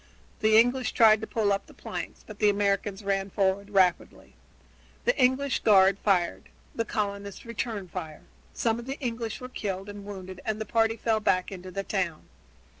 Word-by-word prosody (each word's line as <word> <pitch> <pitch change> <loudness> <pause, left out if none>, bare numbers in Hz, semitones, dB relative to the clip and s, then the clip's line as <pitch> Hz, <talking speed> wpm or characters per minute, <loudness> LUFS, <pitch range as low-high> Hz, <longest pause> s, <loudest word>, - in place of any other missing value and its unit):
The 220 0 +5
English 245 +1 +3
tried 220 -2 +6
to 220 - -5
pull 210 -3 +1
up 195 - -3
the - - -16
planks, - - -7
but 215 -1 -11
the 210 - +5
Americans 200 0 0
ran 195 0 -1
forward 195 +1 0
rapidly. 190 -3 +1 0.7
The - - +3
English 260 +1 +2
guard 195 -2 +5
fired; 175 - 0 0.2
the 230 - -2
colonists 200 -2 -4
returned 220 -4 -4
the - - -28
fire. 160 -5 -6 0.3
Some 230 0 0
of 240 - -9
the 270 +2 -4
English 230 -3 -3
were 250 - -7
killed 195 -5 -4
and 205 0 -8
wounded 190 -2 -8
and 215 0 -2
the 220 - -3
party 225 +1 +2
fell 220 0 +1
back 185 -3 +1
into 185 -1 -8
the 195 +2 -4
town. 180 -6 -2
205 Hz, 185 wpm, -27 LUFS, 195-225 Hz, 0.7 s, tried